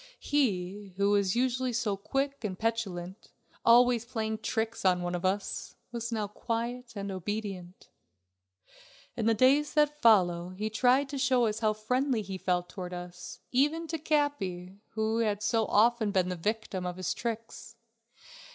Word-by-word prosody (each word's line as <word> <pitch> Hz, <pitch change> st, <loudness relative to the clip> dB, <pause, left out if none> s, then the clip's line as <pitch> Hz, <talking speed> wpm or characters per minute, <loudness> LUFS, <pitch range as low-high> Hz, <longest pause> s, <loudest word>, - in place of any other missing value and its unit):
He, 200 Hz, -8 st, -1 dB
who 200 Hz, +1 st, +3 dB
was 200 Hz, -1 st, +2 dB
usually 255 Hz, +1 st, +1 dB
so 225 Hz, -4 st, 0 dB
quick 270 Hz, +7 st, -2 dB
and 190 Hz, -4 st, -3 dB
petulant, 200 Hz, -5 st, -3 dB, 0.3 s
always 240 Hz, 0 st, +5 dB
playing 220 Hz, -2 st, -3 dB
tricks 225 Hz, +1 st, -2 dB
on 180 Hz, -2 st, +3 dB
one 175 Hz, 0 st, -2 dB
of 175 Hz, 0 st, -3 dB
us, 195 Hz, +2 st, -2 dB, 0.2 s
was 235 Hz, 0 st, -4 dB
now 215 Hz, -2 st, -1 dB
quiet 235 Hz, +3 st, -4 dB
and 200 Hz, -1 st, -4 dB
obedient. 190 Hz, -1 st, -5 dB, 1.3 s
In 230 Hz, -3 st, -1 dB
the 225 Hz, -, +4 dB
days 280 Hz, +6 st, +3 dB
that 300 Hz, 0 st, +2 dB
followed 180 Hz, -6 st, +4 dB
he 215 Hz, +2 st, -2 dB
tried 255 Hz, +5 st, +3 dB
to 280 Hz, -1 st, -4 dB
show 255 Hz, -2 st, +3 dB
us 215 Hz, 0 st, -1 dB
how 215 Hz, -1 st, +2 dB
friendly 250 Hz, +2 st, 0 dB
he 190 Hz, -1 st, -6 dB
felt 180 Hz, -1 st, 0 dB
towards 180 Hz, -1 st, -6 dB
us, 180 Hz, 0 st, -8 dB
even 295 Hz, +6 st, +2 dB
to 325 Hz, -, -2 dB
Capi, 200 Hz, -, -1 dB
who 220 Hz, +1 st, 0 dB
had 210 Hz, -2 st, 0 dB
so 220 Hz, 0 st, +1 dB
often 225 Hz, 0 st, +3 dB
been 185 Hz, -3 st, +1 dB
the 180 Hz, -, -2 dB
victim 205 Hz, +1 st, -2 dB
of 180 Hz, 0 st, -4 dB
his 185 Hz, -, -1 dB
tricks. 230 Hz, 0 st, -5 dB
220 Hz, 160 wpm, -30 LUFS, 190-245 Hz, 1.3 s, always